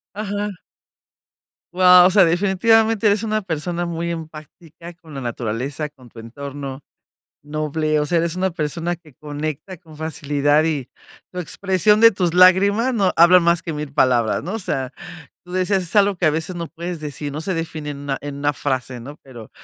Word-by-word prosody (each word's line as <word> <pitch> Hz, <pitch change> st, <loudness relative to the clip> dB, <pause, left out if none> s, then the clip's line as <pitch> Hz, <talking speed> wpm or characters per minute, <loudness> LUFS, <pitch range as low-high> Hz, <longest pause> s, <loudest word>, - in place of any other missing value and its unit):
Ajá. 205 Hz, 0 st, -3 dB, 1.2 s
Guau, 180 Hz, 0 st, +7 dB
o -, -, -1 dB
sea, 190 Hz, -1 st, +6 dB
definitivamente, 205 Hz, +5 st, +2 dB
eres 205 Hz, 0 st, +3 dB
una 215 Hz, -1 st, -1 dB
persona 175 Hz, 0 st, -3 dB
muy 170 Hz, 0 st, -3 dB
empática 160 Hz, +1 st, -9 dB
con 165 Hz, -3 st, -15 dB
la 135 Hz, -, -5 dB
naturaleza, 125 Hz, +5 st, -4 dB
con 135 Hz, -4 st, -19 dB
tu 115 Hz, -, -16 dB
entorno, 135 Hz, +3 st, -7 dB, 0.6 s
noble, 155 Hz, +1 st, -1 dB
o 150 Hz, -, -1 dB
sea, 170 Hz, -, 0 dB
eres 165 Hz, 0 st, 0 dB
una 190 Hz, +1 st, 0 dB
persona 170 Hz, +1 st, -3 dB
que 160 Hz, -4 st, -20 dB
conecta 150 Hz, +5 st, -6 dB
con 160 Hz, -2 st, -17 dB
facilidad, 145 Hz, -1 st, +1 dB
y 150 Hz, -6 st, -2 dB, 0.4 s
tu 180 Hz, -, -8 dB
expresión 190 Hz, +4 st, +1 dB
de 230 Hz, 0 st, +8 dB
tus 185 Hz, -5 st, -1 dB
lágrimas, 200 Hz, +7 st, +4 dB
no, 195 Hz, -5 st, +2 dB
hablan 175 Hz, +2 st, +7 dB
más 170 Hz, 0 st, +2 dB
que 160 Hz, -, -5 dB
1000 150 Hz, -1 st, -6 dB
palabras, 120 Hz, -5 st, +2 dB
¿no? 190 Hz, -, -5 dB
O -, -, -2 dB
sea, 135 Hz, -, -3 dB, 0.6 s
tú 180 Hz, -, -11 dB
dices, 185 Hz, +1 st, +1 dB
es 175 Hz, -, -3 dB
algo 200 Hz, -2 st, +4 dB
que 175 Hz, -, 0 dB
a -, -, +5 dB
veces 160 Hz, +4 st, -3 dB
no 170 Hz, -1 st, -4 dB
puedes 170 Hz, 0 st, -6 dB
decir, 145 Hz, -1 st, -6 dB
no 145 Hz, -, -5 dB
se 185 Hz, +4 st, -2 dB
define 160 Hz, -3 st, -4 dB
en 140 Hz, -, -8 dB
una 140 Hz, -1 st, -3 dB
en 145 Hz, -1 st, -7 dB
una 145 Hz, +1 st, +1 dB
frase, 130 Hz, -3 st, -3 dB
¿no? 140 Hz, +5 st, -10 dB
Pero 120 Hz, -5 st, -12 dB
165 Hz, 185 wpm, -20 LUFS, 145-185 Hz, 1.2 s, de